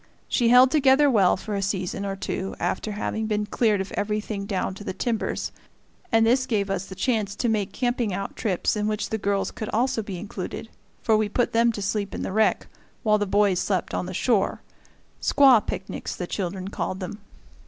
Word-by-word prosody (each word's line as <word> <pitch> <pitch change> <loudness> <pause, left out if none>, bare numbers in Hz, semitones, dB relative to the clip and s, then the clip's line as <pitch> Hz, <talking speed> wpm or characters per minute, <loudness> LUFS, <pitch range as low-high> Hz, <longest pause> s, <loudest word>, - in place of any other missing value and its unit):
She 235 -3 +2
held 250 +2 +7
together 285 -1 +5
well 195 -7 +4
for 210 +2 -6
a 200 - -1
season 195 0 -2
or 195 - -2
two 190 0 -4
after 215 - -2
having 220 +1 -2
been 210 -1 0
cleared 210 -1 +1
of 190 - -6
everything 210 -1 -2
down 195 -1 -1
to 200 - -10
the - - -4
timbers, 225 +2 -2 0.6
and 225 -1 +4
this 255 +3 +3
gave 205 -5 0
us 195 -1 -2
the 190 - -9
chance 205 -1 0
to 245 - -1
make 215 -4 0
camping 245 -3 -1
out 195 +2 -4
trips 195 -2 0
in 210 0 -1
which 215 0 -2
the 220 - -1
girls 200 0 0
could 215 - -6
also 235 0 +1
be 200 -3 -6
included, 195 +3 -6 0.3
for 220 - +4
we 215 -1 +1
put 245 +3 0
them 230 +1 +4
to 205 - -4
sleep 200 0 -2
in - - -4
the - - -3
wreck, 220 +1 +2 0.4
while 210 -2 +3
the 205 - -1
boys 200 -2 +3
slept 185 -3 -1
on 180 - -2
the - - -5
shore; 220 -3 +1 0.6
squaw 265 -6 +6
picnics, 190 - -5
the 180 - -4
children 185 +1 -4
called 190 -2 -3
them. 195 +2 -6
210 Hz, 205 wpm, -25 LUFS, 195-225 Hz, 0.6 s, held